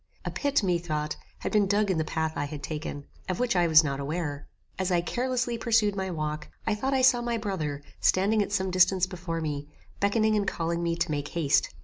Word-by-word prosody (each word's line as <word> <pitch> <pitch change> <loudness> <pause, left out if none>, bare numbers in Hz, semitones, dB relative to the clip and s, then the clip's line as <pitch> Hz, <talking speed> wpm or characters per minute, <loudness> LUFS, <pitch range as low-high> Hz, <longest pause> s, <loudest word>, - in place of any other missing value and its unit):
A - - -2
pit, 285 -5 +1
methought, 170 -5 -1 0.3
had - - -2
been 210 -2 +3
dug 205 0 +2
in 170 - 0
the - - +2
path 160 0 -2
I 145 - -1
had 145 0 -7
taken, 150 -2 -5 0.2
of 185 - -1
which 245 -4 +1
I 175 -1 +4
was 160 0 +7
not 140 -2 -2
aware. 145 0 -3 0.3
As 190 0 0
I 175 -1 +3
carelessly 245 +4 -1
pursued 220 -3 +2
my 190 -1 -2
walk, 155 -2 -3 0.2
I 220 - +1
thought 265 +6 -1
I 260 - +2
saw 250 -2 +5
my 235 -1 -1
brother, 155 -10 -3 0.2
standing 205 +3 +3
at 205 - -2
some 190 -2 0
distance 185 0 +4
before 175 -3 -4
me, 145 -2 -3 0.3
beckoning 215 +2 +2
and 205 -2 0
calling 170 0 -1
me 170 -1 0
to 170 - -1
make 145 -1 -2
haste. 155 -4 +1
180 Hz, 220 wpm, -28 LUFS, 155-210 Hz, 0.3 s, was